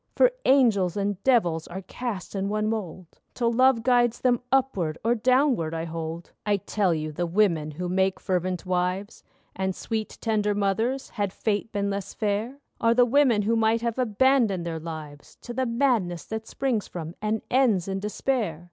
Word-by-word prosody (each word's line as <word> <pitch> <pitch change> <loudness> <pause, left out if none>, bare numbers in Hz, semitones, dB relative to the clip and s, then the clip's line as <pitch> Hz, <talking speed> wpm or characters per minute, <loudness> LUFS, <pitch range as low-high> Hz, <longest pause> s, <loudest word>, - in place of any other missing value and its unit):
For - - +5
angels 215 -10 +4
and 200 -1 -1
devils 175 -11 +2
are 190 +2 -7
cast 210 -1 -5
in 195 0 -2
one 215 +1 0
mould, 185 -6 -5 0.2
Till 235 -2 +1
love 255 -1 +4
guides 240 -2 +2
them 245 -2 +2
upward 200 -13 +1
or 235 - +4
downward, 250 - +2
I 165 0 -3
hold. 165 +1 -6
I 205 -1 +1
tell 200 -1 0
you 155 -1 -2
the 175 +3 -2
women 170 -5 +2
who 175 +4 -5
make 190 +1 +1
fervent 185 -1 -2
wives 185 +3 -2 0.3
And 190 -1 -2
sweet 220 -2 -4
tender 210 -2 0
mothers, 220 +7 0
had 205 -3 -2
Fate 210 +2 -2
been 200 -1 -1
less 200 -1 -5
fair, 215 +5 -1 0.2
Are 230 0 +3
the 245 0 +6
women 245 -4 +3
who 225 +3 +1
might 225 0 +2
have 235 +1 -2
abandoned 235 -5 +2
their 165 -1 -3
lives 155 -3 -9
To 240 - -6
the 260 +1 -1
madness 230 - 0
that 220 0 -5
springs 250 -7 -1
from 165 -2 -6
and 215 +1 -1
ends 235 -9 +3
in 195 0 -2
despair. 210 - -1
205 Hz, 175 wpm, -26 LUFS, 180-235 Hz, 0.3 s, the